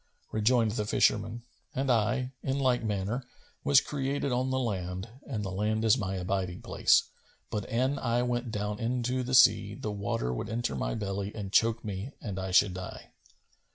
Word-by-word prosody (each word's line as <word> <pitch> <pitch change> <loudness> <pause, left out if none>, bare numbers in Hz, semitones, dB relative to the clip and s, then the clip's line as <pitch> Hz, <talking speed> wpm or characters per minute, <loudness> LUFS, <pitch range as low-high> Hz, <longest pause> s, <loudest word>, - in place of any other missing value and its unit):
Rejoined 110 +1 +3
the 105 -1 -2
fisherman, 110 +3 +1 0.3
"And 135 0 +1
I, 125 +3 +1
in 135 +1 -1
like 130 -3 +2
manner, 105 +4 -2 0.4
was 140 -1 +6
created 140 -1 -2
on 125 +1 +1
the 130 - 0
land 95 -5 -2 0.2
and 110 -7 -3
the 95 - -3
land 110 +3 0
is 110 - +6
my 95 -6 -2
abiding 90 -1 -2
place; - - +4 0.5
but, 105 -2 -3
an 130 +4 +1
I 120 0 +1
went 120 0 -1
down 105 0 -3
into 125 +2 0
the 125 +1 0
sea, - - +6
the 105 - -4
water 100 -12 -2
would - - -4
enter 115 - -2
my - - -2
belly 100 -1 -3
and 100 -3 -5
choke 115 0 +3
me 105 +6 -5
and 100 -4 -5
I 95 0 -3
should 95 +1 +4
die." 90 0 -8
110 Hz, 180 wpm, -29 LUFS, 100-125 Hz, 0.5 s, was